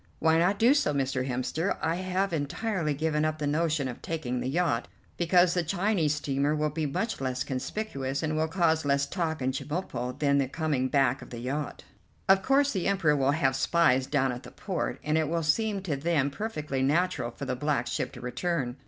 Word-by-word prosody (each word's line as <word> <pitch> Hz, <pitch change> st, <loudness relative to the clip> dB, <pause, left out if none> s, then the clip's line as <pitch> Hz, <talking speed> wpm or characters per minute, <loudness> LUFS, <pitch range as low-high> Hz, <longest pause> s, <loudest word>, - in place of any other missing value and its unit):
"Why 160 Hz, 0 st, +3 dB
not 185 Hz, +4 st, +2 dB
do 235 Hz, +6 st, +5 dB
so, 150 Hz, -, +1 dB
Mr. 130 Hz, -1 st, 0 dB
Hemster. 130 Hz, +8 st, -1 dB
I 165 Hz, +1 st, 0 dB
have 185 Hz, +1 st, -1 dB
entirely 160 Hz, +1 st, -1 dB
given 155 Hz, +1 st, 0 dB
up 155 Hz, 0 st, 0 dB
the 150 Hz, -, -3 dB
notion 150 Hz, -1 st, +1 dB
of 125 Hz, -, -7 dB
taking 135 Hz, -7 st, -3 dB
the 125 Hz, +1 st, -2 dB
yacht, 150 Hz, -5 st, 0 dB, 0.3 s
because 175 Hz, 0 st, +4 dB
the 180 Hz, -, +2 dB
Chinese 175 Hz, -2 st, +1 dB
steamer 145 Hz, +1 st, 0 dB
will 150 Hz, 0 st, 0 dB
be 155 Hz, 0 st, -1 dB
much 220 Hz, +6 st, -2 dB
less 130 Hz, -1 st, -1 dB
conspicuous 135 Hz, -1 st, -3 dB
and 155 Hz, 0 st, -1 dB
will 160 Hz, +1 st, +1 dB
cause 160 Hz, -2 st, +2 dB
less 140 Hz, 0 st, +2 dB
talk 160 Hz, -4 st, -2 dB
in 130 Hz, -, +1 dB
Chemulpo 130 Hz, -4 st, -4 dB
than 140 Hz, -1 st, +2 dB
the 135 Hz, -, +1 dB
coming 145 Hz, -3 st, -1 dB
back 135 Hz, -1 st, +2 dB
of -, -, -11 dB
the 120 Hz, -, -7 dB
yacht. 135 Hz, +5 st, -4 dB, 0.4 s
Of 195 Hz, 0 st, +6 dB
course 275 Hz, +5 st, +3 dB
the 190 Hz, -4 st, -1 dB
Emperor 185 Hz, -7 st, +3 dB
will 135 Hz, -1 st, +2 dB
have 135 Hz, -3 st, +1 dB
spies 135 Hz, -3 st, +3 dB
down 135 Hz, -3 st, +1 dB
at 120 Hz, 0 st, -6 dB
the -, -, -11 dB
port, 190 Hz, -4 st, -3 dB
and 155 Hz, +1 st, +1 dB
it 155 Hz, -, 0 dB
will 165 Hz, 0 st, 0 dB
seem 200 Hz, +5 st, +1 dB
to 160 Hz, -7 st, -1 dB
them 145 Hz, -1 st, +1 dB
perfectly 150 Hz, -7 st, -3 dB
natural 145 Hz, -2 st, +1 dB
for 140 Hz, -, -7 dB
the 130 Hz, -1 st, -2 dB
black 145 Hz, +3 st, 0 dB
ship -, -, -2 dB
to 125 Hz, -, -10 dB
return. 130 Hz, 0 st, -2 dB
150 Hz, 205 wpm, -28 LUFS, 135-175 Hz, 0.4 s, Of